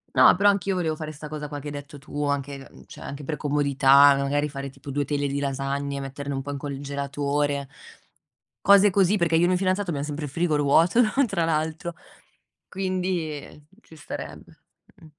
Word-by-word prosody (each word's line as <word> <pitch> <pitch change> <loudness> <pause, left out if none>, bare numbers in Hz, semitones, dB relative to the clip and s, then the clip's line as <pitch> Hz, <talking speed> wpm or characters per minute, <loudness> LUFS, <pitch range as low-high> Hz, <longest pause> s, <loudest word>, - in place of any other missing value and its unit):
No, - - +7
però 200 +2 +4
anch'io 195 -1 0
volevo 165 -4 -1
fare 155 0 -6
'sta 150 0 -9
cosa 150 0 -6
qua 145 0 -6
che 145 - -9
hai - - -7
detto 145 0 -8
tu, 145 +1 -5
anche, 140 -1 -3
mhmm, - - -16
cioè - - -13
anche 140 +1 -7
per 150 +2 -3
comodità, 140 -1 +5
magari 140 +2 0
fare 140 -1 -6
tipo 140 +1 -10
2 145 +1 -1
teglie 145 0 -1
di 140 +1 -2
lasagne, 140 0 -2
metterne 140 +1 -5
un 135 - -3
po' 145 - -5
il 140 - -4
congelatore, 140 0 -2 1.0
cose 200 +1 +7
così, 195 +1 +3
perché 170 -2 +1
io 160 - +5
e - - +2
il - - +3
mio 180 - +2
fidanzato 185 0 0
abbiam 145 -3 -2
sempre 150 0 -5
il 145 - -5
frigo 155 0 0
vuoto, 165 - +4
no, 215 -2 0
tra 195 -6 -1
l'altr; 160 +1 -1 0.8
quindi, 185 -3 -2
ehm, 150 +1 -15 0.2
ci 160 - -17
starebbe, 150 - -9 0.4
mh. - - -18
145 Hz, 200 wpm, -25 LUFS, 140-170 Hz, 1.0 s, No